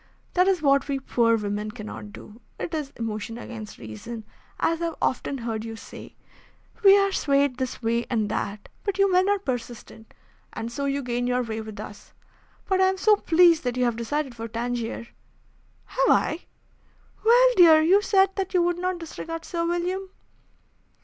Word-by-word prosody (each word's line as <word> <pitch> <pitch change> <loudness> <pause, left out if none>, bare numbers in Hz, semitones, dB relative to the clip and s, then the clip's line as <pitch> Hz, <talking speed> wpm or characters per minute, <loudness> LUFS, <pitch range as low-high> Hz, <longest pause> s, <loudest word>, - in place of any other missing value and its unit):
That 365 +1 +3
is 370 -5 +1
what 275 -1 +3
we 275 -1 -1
poor 230 -3 +2
women 210 0 -3
cannot 215 -1 -8
do. 215 +3 -13 0.2
It 340 - -4
is 300 -3 -2
emotion 225 0 -4
against 225 -3 -8
reason, 125 - -8 0.3
as 330 0 0
I - - 0
have 330 -2 -3
often 275 +2 -1
heard 225 -3 -4
you 225 0 -6
say. - - -11 0.7
We 395 0 +8
are 395 0 +2
swayed 280 -6 +1
this 255 -2 -4
way 235 +1 0
and 220 -4 0
that, 205 0 -4 0.2
but 400 -2 -2
you 395 -1 +3
men 370 +2 +4
are 410 - +3
persistent, 240 - -6 0.4
and 230 +1 -5
so 280 +3 -3
you 280 0 -1
gain 245 0 -1
your 250 0 +1
way 220 -1 -4
with 220 -1 -9
us. 205 - -10 0.5
But 380 -1 +1
I - - +6
am 380 0 0
so 425 +2 +5
pleased 340 -3 +4
that 250 -1 -2
you 250 - +2
have 240 -2 0
decided 270 +4 -2
for 230 -1 -6
Tangier." 235 0 -3 0.8
"Have - - 0
I?" 320 - +2 0.8
"Well, - - +6
dear, 330 -4 +8
you 380 +5 +5
said 390 -2 +3
that 380 -1 -2
you 355 - +4
would 350 0 0
not 365 0 -1
disregard 330 0 -7
Sir 335 -1 -2
William." 360 +3 -2
275 Hz, 185 wpm, -25 LUFS, 230-360 Hz, 0.8 s, We